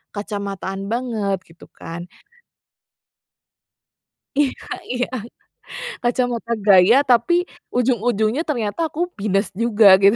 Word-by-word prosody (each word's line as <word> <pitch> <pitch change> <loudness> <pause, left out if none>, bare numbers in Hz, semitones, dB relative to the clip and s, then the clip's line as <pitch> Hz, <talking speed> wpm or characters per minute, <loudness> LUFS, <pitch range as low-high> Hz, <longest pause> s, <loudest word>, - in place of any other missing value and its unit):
kacamataan 200 -1 -4
banget 220 -5 -1
gitu 165 +1 -17
kan. 170 +2 -8 2.3
Iya 280 -2 0 0.3
iya. 250 0 0 1.0
Kacamata 240 -1 0
gaya 195 +3 +7
tapi 245 +4 +3 0.4
ujung-ujungnya 240 0 +1
ternyata 235 -3 -2
aku 305 - -9 0.2
minus 195 -1 +1
juga 225 -3 +5
gitu. 200 +3 +5
220 Hz, 90 wpm, -21 LUFS, 200-245 Hz, 2.3 s, gaya